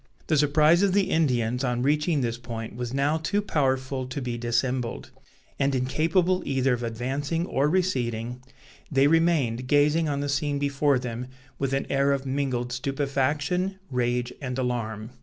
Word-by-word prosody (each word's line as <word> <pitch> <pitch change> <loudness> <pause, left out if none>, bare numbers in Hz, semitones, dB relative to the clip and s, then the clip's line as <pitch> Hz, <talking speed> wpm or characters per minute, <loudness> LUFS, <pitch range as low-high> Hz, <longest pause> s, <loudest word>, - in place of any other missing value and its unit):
The 155 - +1
surprise 150 +3 +4
of 200 -2 +3
the 200 -1 +2
Indians 125 -5 +1
on 125 -1 0
reaching 150 +2 +2
this 120 -1 -2
point 115 -2 -6
was 120 0 -4
now 140 +4 +1
too 200 +6 0
powerful 130 -7 -1
to 130 +2 -4
be 125 -3 -3
dissembled; 120 +1 -2 0.5
and 140 -1 +2
incapable 165 +8 +1
either 135 -1 +1
of 120 - -2
advancing 135 +8 -2
or 140 -3 +1
receding, 125 -9 -1 0.5
they 135 -1 +4
remained 145 -7 +2
gazing 150 +3 +3
on 140 -1 -1
the 145 - -2
scene 145 0 0
before 140 0 +2
them 125 0 -5 0.3
with 135 -1 -1
an 135 0 0
air 140 0 +3
of 140 -1 -2
mingled 130 -3 -1
stupefaction, 140 +8 -1
rage, 125 0 0
and 130 -2 -4
alarm. 115 -3 -3
135 Hz, 160 wpm, -26 LUFS, 125-150 Hz, 0.5 s, surprise